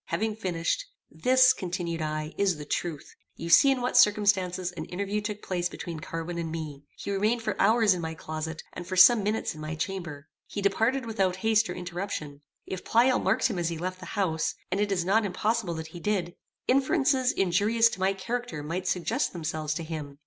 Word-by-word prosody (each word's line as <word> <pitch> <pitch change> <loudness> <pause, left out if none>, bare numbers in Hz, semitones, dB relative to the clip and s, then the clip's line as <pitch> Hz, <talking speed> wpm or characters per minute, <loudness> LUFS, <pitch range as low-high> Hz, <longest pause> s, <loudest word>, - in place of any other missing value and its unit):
Having 220 0 -2
finished, 185 - -1 0.3
"This," 255 0 +5
continued 175 -2 -3
I, 155 0 -3
"is 195 -5 +1
the 150 - -7
truth; 155 0 -4 0.2
you 170 +1 -5
see 275 - +8
in 265 -2 +2
what 250 - -1
circumstances 200 -6 +3
an 160 -3 -6
interview 200 +4 -2
took 210 0 -5
place 175 -1 -1
between 170 -3 -6
Carwin 165 +2 -5
and 165 -1 -3
me. 150 -3 -6
He - - -5
remained 215 +4 +1
for - - -1
hours 220 -1 +5
in 180 - -4
my 160 0 -4
closet, 160 +1 -5
and 175 - -7
for 185 - -3
some 215 +5 +8
minutes 210 +2 -1
in 155 - -10
my 155 +1 -4
chamber. 160 -4 -5 0.2
He - - -5
departed 225 +6 +1
without 195 -5 0
haste 220 0 +3
or - - -4
interruption. 175 -5 -5 0.2
If 185 -1 -6
Pleyel 250 +3 +3
marked 205 +6 +1
him 205 -7 -3
as 170 -1 0
he 165 - -4
left 185 +2 -4
the 185 - -9
house, 160 -6 0 0.2
and 190 - 0
it 205 -1 0
is 180 -3 0
not 215 +4 +3
impossible 205 -1 -1
that 160 0 -6
he 175 - -7
did, 180 -2 -1 0.3
inferences 265 -1 +3
injurious 205 +5 +3
to 195 - -7
my 190 +1 +2
character 230 -4 -4
might 175 +5 -3
suggest 185 - 0
themselves 155 -2 -3
to 165 - -3
him. 150 -3 -6
185 Hz, 200 wpm, -28 LUFS, 165-215 Hz, 0.3 s, see